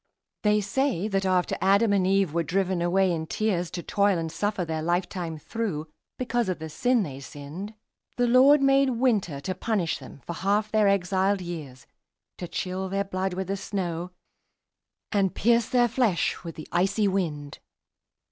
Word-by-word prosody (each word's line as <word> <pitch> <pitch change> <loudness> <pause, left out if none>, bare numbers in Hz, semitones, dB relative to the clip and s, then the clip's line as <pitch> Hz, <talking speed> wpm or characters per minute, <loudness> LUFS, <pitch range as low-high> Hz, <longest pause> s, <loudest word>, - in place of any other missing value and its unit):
They 210 0 +3
say 215 -1 0
that 195 -1 0
after 185 -1 +1
Adam 200 +3 +4
and 190 -2 +2
Eve 195 -4 +2
were 170 - +1
driven 180 +2 0
away 185 +2 +2
in 160 -2 -3
tears 180 -5 -1
To 175 0 -6
toil 200 -2 +2
and 165 -1 -3
suffer 205 -1 -1
their 160 -1 -3
life 175 +3 0
time 170 -4 -5
through, 160 -3 -4 0.3
because 240 -4 -1
of 185 - -1
the 160 0 -7
sin 245 +5 +2
they 135 -6 -6
sinned, 150 +10 -8 0.4
The 245 - +3
Lord 265 +4 +6
made 275 0 +4
Winter 225 - +1
to 185 - -3
punish 185 -3 -1
them 140 - -12
for 170 - -4
half 205 +4 0
their 215 -2 +3
exiled 195 0 +2
years, 155 -8 -7 0.5
To 175 - -4
chill 185 +2 -3
their 195 +1 0
blood 190 -1 -3
with 190 +1 -2
the 195 +2 -2
snow, 180 -3 -3 1.0
and 195 -4 +1
pierce 235 0 +3
their 245 -1 +4
flesh 230 -6 0
with 165 -2 -7
the 155 - -9
icy 195 +4 +2
wind. 155 -7 -2
190 Hz, 175 wpm, -26 LUFS, 170-210 Hz, 1.0 s, Lord